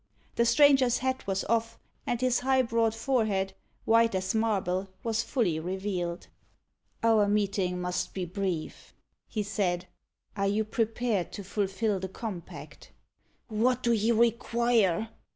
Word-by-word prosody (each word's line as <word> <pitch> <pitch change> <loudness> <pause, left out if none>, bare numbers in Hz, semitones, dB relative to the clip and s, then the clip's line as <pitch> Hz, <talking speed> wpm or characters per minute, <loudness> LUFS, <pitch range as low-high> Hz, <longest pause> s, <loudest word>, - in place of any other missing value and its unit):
The 235 - +2
stranger's 265 -1 +5
hat 260 -2 -2
was 195 0 0
off, 230 0 0 0.3
and 240 - 0
his 255 -1 +2
high 260 +1 +2
broad 230 -1 +1
forehead, 220 -6 0 0.3
white 230 -1 +4
as 190 0 -1
marble, 195 -4 0
was 225 -1 0
fully 210 - 0
revealed. 180 0 -3 0.8
"Our 220 -3 +4
meeting 200 -3 0
must 180 0 -3
be 185 -2 -2
brief," 180 -3 -4 0.3
he 215 - -2
said. 185 -4 -1 0.5
"Are 200 -1 0
you 205 +2 +1
prepared 225 -3 -1
to 200 - -6
fulfil 200 +1 -1
the 190 0 -5
compact?" 190 -3 -8 0.6
"What 245 +3 +1
do 235 - +2
you 225 +1 +2
require?" 230 -3 +2
215 Hz, 135 wpm, -28 LUFS, 190-230 Hz, 0.8 s, stranger's